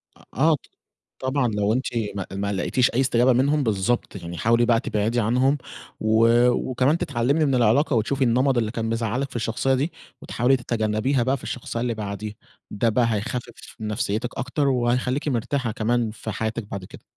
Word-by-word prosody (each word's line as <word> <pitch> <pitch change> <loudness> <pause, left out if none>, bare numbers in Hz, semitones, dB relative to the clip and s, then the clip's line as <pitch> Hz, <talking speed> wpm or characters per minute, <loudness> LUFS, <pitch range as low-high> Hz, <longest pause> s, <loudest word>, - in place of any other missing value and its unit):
آه - - -21
آه 155 +6 +3
ط - - -11 0.6
طبعًا 130 -1 0
لو 105 -1 0
أنتِ 130 +3 0 0.3
ما 95 - -3
ما 100 +1 -2
لقيتيش 125 +5 +1
أي 125 - 0
استجابة 125 -1 +3
منهم، 140 +4 +2
بِالضبط 110 0 0
يعني 85 -2 -7
حاولي 115 +1 +3
بقى 115 -1 +3
تبعدِي 110 +1 0
عنهم، 130 +6 +2 0.4
و 110 +1 +4 0.2
وكمان 130 +5 +1
تتعلّمِي 140 +6 +1
من 140 -3 +1
العِلاقة، 125 +4 +3
وتشوفِي 130 +5 +1
النمط 130 +2 +2
اللي 110 -2 0
كان 115 0 -3
مزعَّلِك 115 +4 -1
في - - -7
الشخصية 120 +4 0
دي، 145 +6 -1 0.3
وتحاولي 125 +3 +2
تتجنّبيها 120 +2 0
بقى 130 +3 +1
في - - -14
الشخصية 120 -1 -4
اللي 120 -1 -1
بعديه، 105 0 -5 0.4
ده 110 +3 0
بقى 115 +2 +2
هيخفِّف 120 +3 -5
من 110 - -4
نفسيتِك 110 +1 -2
أكتر، 140 +2 0
وهخليكِ 125 +3 0
مرتاحة 125 -1 -1
كمان 115 +1 0
في 110 0 -7
حياتِك 110 +1 -3
بعد 100 -2 -7
كده. - - -13
120 Hz, 180 wpm, -24 LUFS, 110-130 Hz, 0.6 s, و